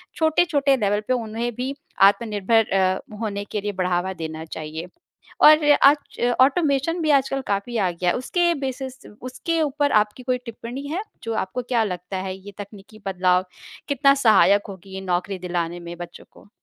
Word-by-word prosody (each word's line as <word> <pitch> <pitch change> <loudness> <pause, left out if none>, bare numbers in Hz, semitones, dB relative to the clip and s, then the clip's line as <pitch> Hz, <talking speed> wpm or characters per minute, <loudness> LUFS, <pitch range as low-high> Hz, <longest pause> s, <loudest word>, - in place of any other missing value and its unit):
छोटे-छोटे 315 -3 +2
लेवल 205 -2 0
पे 255 - +2
उन्हें 230 0 -2
भी 260 +3 -3 0.3
आत्मनिर्भर 210 +1 +3
अ, 190 -1 +2 0.2
होने 200 -2 -3
के 210 - -2
लिए 205 - -2
बढ़ावा 185 0 -1
देना 160 -2 -6
चाहिए। 160 +1 -7 0.6
और 305 0 +8 0.2
आज 290 0 +2 0.2
ऑटोमेशन 285 +3 +2
भी 310 - +1
आजकल 270 0 -3
काफ़ी 200 +4 -2
आ 190 -4 +2
गया। 175 +1 0
उसके 345 +7 +1
बेसिस 265 0 -5 0.2
उसके 325 +6 -2
ऊपर 290 -1 0
आपकी 210 +4 -4
कोई 250 0 0
टिप्पणी 240 +4 -7
है 340 +7 -2 0.2
जो 230 - -3
आपको 245 +7 -5
क्या 240 -2 +1
लगता 180 -1 -5
है, 185 0 -4
ये 200 +1 -12
तकनीकी 205 +1 -11
बदलाव 185 -1 +2 0.4
कितना 275 0 +4
सहायक 200 -1 +5
होगी 190 0 -9
नौकरी 185 +1 -2
दिलाने 175 -1 -3
में 170 0 -8
बच्चों 175 - -9
को? - - -19
210 Hz, 160 wpm, -23 LUFS, 185-265 Hz, 0.6 s, और